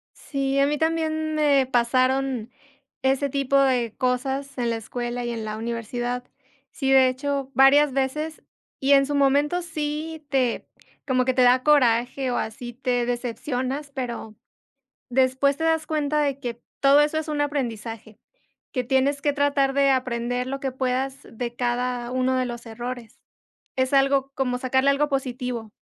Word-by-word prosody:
Sí, 275 -1 -2
a 275 - +4
mí 295 - 0
también 315 0 -1
me 285 -3 +3
pasaron 255 0 +1 0.5
ese 270 +1 +1
tipo 275 0 +1
de 250 -4 +1
cosas 265 +2 -1
en 240 -1 0
la 230 - -1
escuela 240 +2 -4
y 240 - -2
en 225 -2 -4
la 215 0 -4
universidad. 240 +2 -3 0.5
Sí, 270 0 -1
de 265 -1 +7
hecho, 275 +1 -2
varias 270 +2 +5
veces, 300 +4 -2 0.4
y 275 +1 +3
en 275 0 +5
su 290 +1 -2
momento 285 +5 +2
sí 310 -1 -4
te 255 -4 0 0.4
como 255 -1 +2
que 260 - +1
te 255 - +2
da 250 +1 +5
coraje 255 -2 +3
o 245 - -1
así, 240 +2 -5
te 245 -1 -1
decepcionas, 255 +3 -3
pero 235 -4 -5 0.7
después 260 +2 +2
te 320 - -3
das 320 -1 +1
cuenta 300 -1 0
de 280 -2 0
que 240 -3 -6 0.2
todo 280 +1 +6
eso 295 +1 +1
es 315 0 -2
un 300 -1 -2
aprendizaje, 230 -7 -4 0.5
que 250 -1 -1
tienes 270 +2 +1
que 290 - +2
tratar 285 -1 +1
de 280 0 +3
aprender 250 -1 -1
lo 270 +1 -4
que 270 -1 -2
puedas 260 +1 -1
de 235 +1 -6
cada 245 0 -1
uno 255 0 +1
de 255 - +1
los 240 -1 -6
errores. 240 +2 -7 0.6
Es 260 +1 0
algo 275 0 +3
como 250 -2 -1
sacarle 265 +2 +2
algo 290 +2 +1
positivo. 250 -4 -3
265 Hz, 165 wpm, -24 LUFS, 245-280 Hz, 0.7 s, de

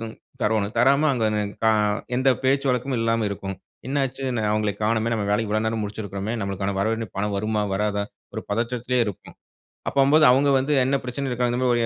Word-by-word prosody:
த - - -4 0.4
தரவேணும், 105 0 0
தராம 140 +5 +4
அங்கே 115 -3 0
நி 105 - +1 0.2
க - - +4 0.5
எந்த 130 +2 +2
பேச்சு 135 +1 +2
வழக்கமும் 125 0 -1
இல்லாம 115 -1 +1
இருக்கும். 95 -1 -5 0.3
"என்ன 140 +1 0
ஆச்சு? 135 +1 -9
இன்னும் 110 -4 -1
அவுங்கள 105 -1 0
காணோமே, 110 +1 +1
நம்ம 105 -2 -1
வேலை 105 +2 +2
இவ்வளவு 110 +1 0
நேரம் 110 -1 -1
முடிச்சிருக்கிறோமே! 100 0 -4
நம்மளுக்கான 100 0 -2
வரவேண்டிய 110 +1 -1
பணம் 100 +1 -1
வருமா? 105 +1 0
வராதா?" 105 0 0 0.3
ஒரு - - -4
பதற்றத்திலேயே 120 +3 0
இருக்கும். 100 -3 -7 0.6
அப்படினும்போது 140 +3 +4
அவுங்க 140 +3 +3
வந்து 145 +3 0
என்ன 135 - +1
பிரச்சனையில 130 +2 -3
இருக்காங்க 125 0 0
இந்த 125 - -1
மாரி 125 - +3
115 Hz, 185 wpm, -23 LUFS, 105-130 Hz, 0.6 s, தராம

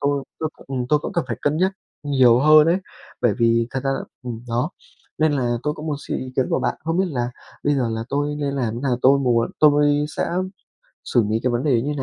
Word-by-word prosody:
tôi 140 -1 0 0.2
tôi 160 - 0
cũng - - -18
ừm, 125 -1 -2
tôi 150 - +4
cũng - - -6
cần - - 0
phải 115 - -2
cân 145 +1 +1
nhắc 185 +3 +2 0.3
nhiều 130 -5 +4
hơn 155 +1 +7
ấy. 170 +3 +3 0.4
Bởi 120 -4 +2
vì 115 0 +3
thật 130 - -2
ra 135 - +1
là 135 - -1 0.2
ừm, 120 -3 -5
đó, 120 +7 0 0.5
nên 155 -1 +3
là 120 -4 0
tôi 150 0 -1
cũng 155 +1 -8
muốn 150 -2 -1
xin - - -1
ý 130 0 -7
kiến 130 - +2
của - - +1
bạn. - - 0
Không 165 +2 0
biết 190 - +2
là 120 -6 -2 0.3
bây 145 - +3
giờ 130 -4 0
là 115 0 -3
tôi 145 +2 -1
nên 140 -1 -2
làm 120 -5 -1
thế 120 - -5
nào, 130 -3 +1
tôi 135 +2 +6
muốn 120 -4 +1
tôi 145 -1 +4
sẽ - - -1 0.7
xử 120 -3 +2
lý 110 +1 0
cái 125 - +1
vấn 120 +1 0
đề 125 -6 +2
như 145 +3 -2
thế 135 - -2
135 Hz, 260 wpm, -22 LUFS, 120-150 Hz, 0.7 s, hơn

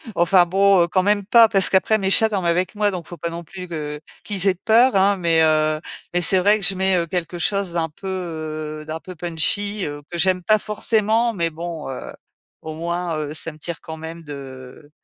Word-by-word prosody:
enfin, 175 +1 +4
bon, 195 0 +4
heu, - - 0
quand 185 +2 +1
même 205 -1 +1
pas. 230 0 +6
Parce 195 -3 +3
qu'après, 205 +3 +3
mes 190 -2 -1
chats 220 +2 +5
dorment 190 -4 -2
avec 175 +3 0
moi. 205 -1 +1
Donc, 175 -3 -6
faut 175 - -9
pas 170 +3 -4
non 170 +1 -7
plus 180 +2 -9
que 150 -3 -5 0.2
qu'ils 200 -2 -1
aient 190 - +3
peur, 230 +6 +3
hein. 195 +1 +3
Mais, 165 -2 +2
heu, 155 0 +2 0.3
mais, 175 - +1
c'est 185 +2 +3
vrai 205 +3 +4
que - - -6
je 195 +1 +3
mets, 190 0 +1
heu, 170 -1 -1
quelque 175 0 -4
chose 195 0 -1
d'un 165 -2 -1
peu, 190 +6 -11
heu, 155 -4 -5
d'un 160 +1 -5
peu 185 -1 -10
punchy, 185 +5 0
heu, 145 0 -6
que 175 - -5
j'aime 185 +1 +3
pas 215 +2 +4
forcément. 220 +2 +1
Mais, 170 -3 -1
bon, 165 -2 -6
heu, 130 - -7 0.5
au 160 0 -7
moins, 170 0 -3
heu, 150 -1 -4
ça 165 +1 -4
me 155 - -16
tire 170 +2 -6
quand 160 0 -8
même 165 +1 -8
de 135 -1 -10
175 Hz, 225 wpm, -21 LUFS, 160-195 Hz, 0.5 s, pas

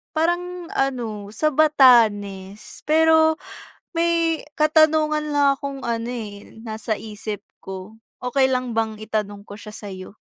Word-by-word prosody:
Parang 350 +2 -1
ano, 230 -7 -2
sa 265 +8 0
Batanes. 220 -9 +3
Pero, 320 0 +4 0.6
may 335 -1 +1 0.2
katanungan 305 -1 +3
lang 285 -1 +3
akong 280 -1 -6
ano, 235 -1 -3
eh, 210 -4 -8
nasa 220 -1 -4
isip 210 -1 -6 0.2
ko. 190 +3 -8 0.2
Okey 265 +1 +2
lang 250 -2 -2
bang 220 -1 -1
itanong 210 -2 -3
ko 205 - -8
siya 210 0 -11
sa'yo? 195 -1 -9
245 Hz, 120 wpm, -22 LUFS, 210-310 Hz, 0.6 s, Pero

